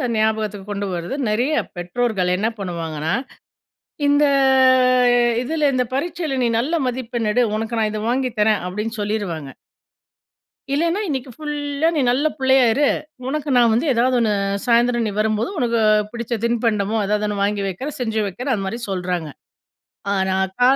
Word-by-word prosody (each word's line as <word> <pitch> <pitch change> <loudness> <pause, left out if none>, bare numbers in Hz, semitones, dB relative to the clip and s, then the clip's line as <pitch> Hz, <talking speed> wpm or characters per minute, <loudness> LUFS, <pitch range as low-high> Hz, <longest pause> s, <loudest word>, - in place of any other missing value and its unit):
ஞாபகத்துக்கு 215 -2 -1
கொண்டு 200 0 -3
வர்றது 175 +8 -4
நெறைய 245 +8 +1 0.2
பெற்றோர்கள் 180 +1 -1
என்ன 215 - 0
பண்ணுவாங்கன்னா, 165 -3 -3 0.9
"இந்த 290 +1 +4 1.2
இதுல 305 +1 +1
இந்த 250 0 +1
பரீட்சையில, 310 -2 -2
நீ 235 - +2
நல்ல 290 +8 0
மதிப்பெண் 240 -3 -2
எடு. 245 +2 +3
உனக்கு 225 +2 -3
நான் 215 -1 +1
இத 215 0 -4
வாங்கிதரேன்" 225 -5 +1
அப்டின்னு 210 +4 -4
சொல்லிருவாங்க. 185 -10 -3 1.2
இல்லைன்னா 335 +7 +1
"இன்னைக்கு 265 -3 -3
ஃபுல்லா 295 +1 -2
நீ - - +2
நல்ல 260 +5 +2
புள்ளையா 265 -1 +4
இரு. 280 +4 +2 0.4
உனக்கு 295 +2 -3
நான் 235 -1 +5
வந்து 235 +8 +1
ஏதாவது 250 +1 +2
ஒண்ணு 220 -2 +2 0.3
சாயந்திரம் 240 0 +3
நீ - - -1
வரும்போது, 215 +1 0
உனக்கு 235 -3 +1 0.3
புடிச்ச 235 0 -4
தின்பண்டமோ, 225 -3 0
ஏதாவது 210 +1 0
ஒண்ணு 205 -1 -3
வாங்கி 205 0 -1
வக்கிறேன், 265 +11 -5
செஞ்சு 220 -3 -1
வக்கிறேன்." 250 +8 -3
அந்த 195 -3 -3
மாதிரி 230 +5 -4
சொல்றாங்க. 180 -4 -2 0.9
ஆனா 190 -1 0 0.2
க - - -4
230 Hz, 145 wpm, -21 LUFS, 205-260 Hz, 1.2 s, நான்